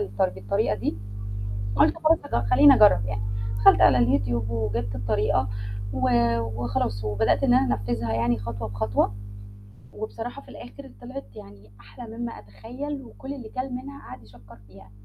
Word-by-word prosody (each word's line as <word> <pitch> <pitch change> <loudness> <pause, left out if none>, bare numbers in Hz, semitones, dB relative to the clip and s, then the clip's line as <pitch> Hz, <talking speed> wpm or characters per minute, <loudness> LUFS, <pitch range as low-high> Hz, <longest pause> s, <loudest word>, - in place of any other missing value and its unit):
الطر 100 +1 0
بالطريقة 100 +2 -1
دي، 105 0 -2 0.8
قُلت - - +4
خلاص 325 +1 +4 0.2
هاج - - +1
خلّيني 285 - +8
أجرب 105 - +5
يعني. 105 -1 -3 0.4
دخلت 110 +2 +6
على 110 +4 +6
الYouTube 115 -1 +1
وجِبت 110 -2 -2
الطريقة 105 -1 0 0.4
و 90 - -3 0.4
وخلاص 110 -2 -2
وبدأت 105 - +1
إن 245 - +4
أنا 260 - +3
أنفذها 115 +1 -3
يعني 115 0 +1
خطوة 110 +1 -5
بخطوة، 100 0 0 0.8
وبصراحة 230 +5 -6
في - - -21
الآخر 270 +2 -11
طلعت 260 +3 -8
يعني 100 +1 -13
أحلى 220 - -11
مما 235 -1 -3
أتخيل 255 - -7
وكُل 265 +3 -9
اللي 240 -5 -9
كَل 255 +3 -4
منها 275 +3 -7
قعد 125 - -10
يشكَّر 110 +1 -17
فيها. 95 +1 -16
115 Hz, 150 wpm, -25 LUFS, -, 0.8 s, خلّيني